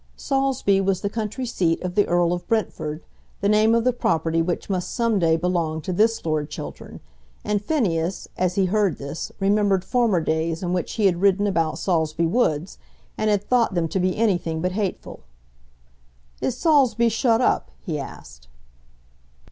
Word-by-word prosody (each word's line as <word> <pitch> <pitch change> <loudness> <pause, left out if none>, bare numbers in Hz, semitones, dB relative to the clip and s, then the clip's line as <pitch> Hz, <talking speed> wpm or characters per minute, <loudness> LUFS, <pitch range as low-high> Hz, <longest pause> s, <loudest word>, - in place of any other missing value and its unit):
Saulsby 270 -8 +1
was 190 -1 0
the 200 - -2
country 225 +4 -3
seat 175 -8 0
of 180 -1 -3
the 205 +2 +2
Earl 175 0 +2
of 175 - -5
Brentford, 170 -8 -2 0.4
the 200 - 0
name 215 +2 +4
of 230 - +2
the 255 +1 +2
property 165 -7 0
which 170 +1 -2
must 185 -3 -2
some 230 -4 +1
day 165 -2 +3
belong 165 -2 -1
to 185 - -4
this 220 +3 +1
Lord 155 -2 -1
Chiltern, - - -8 0.4
and 210 -1 0
Phineas, 190 - -1
as 185 -1 0
he 195 - +2
heard 200 -1 +1
this, 140 +3 -6
remembered 200 -1 +2
former 235 -7 +2
days 160 +2 -1
in 175 0 -1
which 180 -2 -2
he 215 - 0
had 175 -2 +2
ridden 200 +1 +3
about 165 -5 0
Saulsby 165 -2 0
Woods, 165 -3 0 0.4
and 215 - 0
had 205 -1 +1
thought 240 -5 +2
them 170 -2 +1
to 190 - -1
be 185 0 0
anything 175 -7 0
but 180 +3 -1
hateful. 200 0 -4 1.2
"Is 250 - -1
Saulsby 255 -7 +3
shut 225 +1 +2
up?" 250 - +1
he 160 -6 -4
asked. - - -10
190 Hz, 170 wpm, -23 LUFS, 165-215 Hz, 1.2 s, name